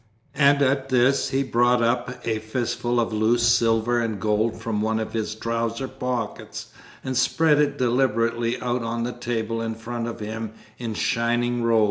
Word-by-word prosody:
And 140 0 +4
at 135 0 +1
this 130 +2 +3
he 135 +1 +1
brought 120 -1 +2
up 125 +1 -1
a 110 -1 0
fistful 120 +2 -1
of 115 -1 0
loose 110 +2 +2
silver 120 0 +3
and 110 -3 -2
gold 110 +2 0
from 110 -2 -2
one 110 +1 0
of 110 - -4
his 110 -1 -2
trouser 115 +3 -2
pockets, 125 -4 -4 0.3
and 130 0 -3
spread 150 +4 +3
it 145 -1 +1
deliberately 120 -2 +1
out 125 0 0
on 115 0 -2
the 120 +1 -3
table 115 -2 -3
in 115 -1 -3
front 115 +1 -5
of 115 - -6
him 110 0 -5 0.3
in 115 -3 -4
shining 120 +1 0
rows. 115 -1 +3
120 Hz, 170 wpm, -24 LUFS, 115-125 Hz, 0.3 s, And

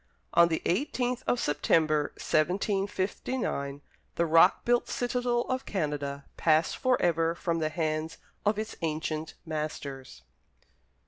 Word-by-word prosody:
On 170 0 +7
the 160 -1 -2
eighteenth 250 - 0
of 245 - +2
September, 155 -2 +2
1759, 190 - -1 0.3
the 170 - +2
rock 165 +3 +5
built 240 0 +2
citadel 245 -1 0
of 255 +2 -3
Canada 145 -6 -2
passed 160 0 +3
for 255 -1 +2
ever 165 -1 +2
from 170 -2 -1
the 155 -1 0
hands 155 0 -2 0.3
of 210 0 +2
its 215 0 -4
ancient 155 -1 -3
masters. 140 - -5
165 Hz, 120 wpm, -29 LUFS, 155-210 Hz, 0.3 s, On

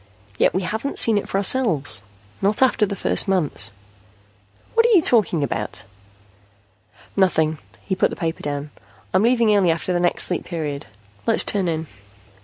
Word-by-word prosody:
Yet - - +2
we 185 - 0
haven't 220 +10 -4
seen 220 -3 +3
it - - -9
for - - -1
ourselves, 185 - +3 0.4
not 205 +5 +3
after 245 -4 +2
the 200 - -4
first - - +1
months 175 -11 +1 0.5
..." 100 0 -34
"What 460 - +4
are 465 - +4
you 355 - +6
talking 185 -10 +2
about?" 115 -6 -4 1.3
"Nothing." 160 -5 +1 0.3
He 190 - -2
put 190 - +1
the - - -7
paper 165 -3 -4
down. 145 0 -5 0.4
"I'm 185 - +3
leaving 230 -2 +3
early 190 -4 +3
after 165 +2 -1
the 175 - 0
next 175 0 +1
Sleep 180 - -2
Period. 150 -7 -5 0.4
Let's - - +3
turn 195 -3 -1
in." 160 -1 -2
180 Hz, 170 wpm, -21 LUFS, 150-210 Hz, 1.3 s, you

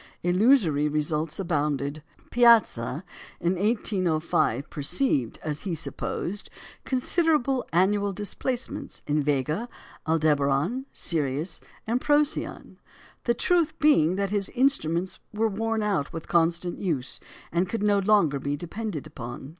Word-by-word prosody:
Illusory 175 - +4
results 150 +2 -1
abounded. 150 -4 -1 0.3
Piazza 220 - +4 0.4
in 175 +2 +1
1805 180 - 0
perceived, 145 - 0
as 150 -1 -3
he 185 -5 -3
supposed, 185 +5 -4 0.4
considerable 270 -1 +1
annual 200 +4 +2
displacements 235 +6 -4
in 150 0 +1
Vega, 150 - -1 0.4
Aldebaran, 155 - +1
Sirius, 155 +1 -2 0.2
and 240 +3 0
Procyon; 295 0 0 0.5
the 235 - +2
truth 340 -3 +1
being 185 - +4
that 200 0 -1
his 200 -2 +1
instruments 185 - +1 0.2
were 225 +1 +2
worn 220 +1 -1
out 195 -9 0
with 165 -2 -7
constant 170 +1 +1
use, 150 -9 -2 0.3
and 175 +2 0
could 225 -1 -2
no 205 -1 +3
longer 195 -8 +3
be 140 +2 -2
depended 175 -1 -5
upon. 130 -3 -8
180 Hz, 115 wpm, -26 LUFS, 150-225 Hz, 0.5 s, Illusory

